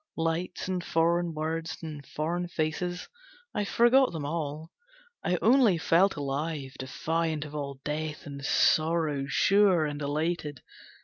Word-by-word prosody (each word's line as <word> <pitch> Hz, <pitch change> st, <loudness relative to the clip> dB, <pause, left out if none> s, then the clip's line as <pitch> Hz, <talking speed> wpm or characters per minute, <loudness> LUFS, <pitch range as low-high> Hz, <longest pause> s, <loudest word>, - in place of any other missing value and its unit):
Lights 165 Hz, +3 st, -2 dB
and 185 Hz, -2 st, -2 dB
foreign 170 Hz, 0 st, +1 dB
words 160 Hz, +1 st, -3 dB
and 150 Hz, -3 st, -6 dB
foreign 170 Hz, +5 st, -3 dB
faces, 175 Hz, +2 st, -2 dB, 0.5 s
I 210 Hz, -, -1 dB
forgot 245 Hz, +5 st, +4 dB
them 160 Hz, -4 st, -4 dB
all; 155 Hz, +1 st, -4 dB, 0.5 s
I 180 Hz, -, +1 dB
only 235 Hz, -5 st, +5 dB
felt 175 Hz, +4 st, +3 dB
alive, 145 Hz, -1 st, -3 dB
defiant 160 Hz, +3 st, -2 dB
of 150 Hz, -, -10 dB
all 140 Hz, -2 st, -5 dB
death 150 Hz, 0 st, -4 dB
and 140 Hz, -1 st, -8 dB
sorrow, 155 Hz, -1 st, +2 dB
Sure 190 Hz, +1 st, +4 dB
and 145 Hz, 0 st, -4 dB
elated. 150 Hz, 0 st, -2 dB
160 Hz, 130 wpm, -28 LUFS, 150-175 Hz, 0.5 s, only